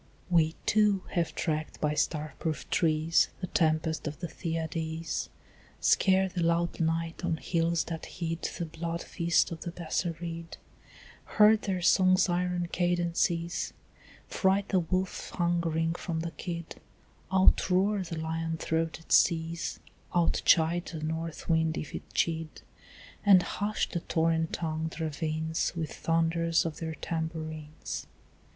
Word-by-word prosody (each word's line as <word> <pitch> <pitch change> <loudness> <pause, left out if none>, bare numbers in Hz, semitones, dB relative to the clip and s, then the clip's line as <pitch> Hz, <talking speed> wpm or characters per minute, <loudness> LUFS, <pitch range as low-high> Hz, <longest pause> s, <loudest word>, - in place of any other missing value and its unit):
We 160 -2 +4
too 210 -3 +3
have 170 -2 -1
tracked 155 -2 -2
by 150 -1 +1
star 150 -1 -1
proof 155 -5 -3
trees 160 0 +3
The 185 - -2
tempest 160 -2 +1
of 150 0 -5
the - - -3
Thyiades 160 0 -3 0.5
Scare 190 0 +4
the 180 -1 -3
loud 170 +1 +1
night 165 0 -1
on 160 - 0
hills 165 0 +1
that 165 -1 -6
hid 165 -2 -4
The 170 - -3
blood 165 +1 -4
feasts 170 +1 +1
of 165 - -6
the 175 - -4
Bassarid, 170 0 -4 0.8
Heard 215 0 +7
their 185 -3 -2
song's 185 +1 +5
iron 175 0 0
cadences 175 -1 0 0.5
Fright 195 +1 +1
the 190 - +3
wolf 185 +2 -2
hungering 170 -2 +1
from 170 -2 -3
the 165 0 -4
kid, 170 -2 -6 0.5
Outroar 190 +1 +4
the 170 -2 -5
lion 160 0 -2
throated 165 0 -2
seas, 165 0 +2 0.4
Outchide 170 0 +3
the 155 -1 -5
north 160 0 -4
wind 160 -1 +2
if 155 - -5
it - - -7
chid, 165 -1 -1 0.6
And 195 -3 +7
hush 210 +1 -1
the 170 - -3
torrent 165 -1 +1
tongued 160 0 -3
ravines 160 +1 -1
With 160 -4 -3
thunders 165 0 +1
of 160 -2 -3
their 160 -1 -4
tambourines. 155 -2 -5
165 Hz, 130 wpm, -29 LUFS, 160-175 Hz, 0.8 s, Heard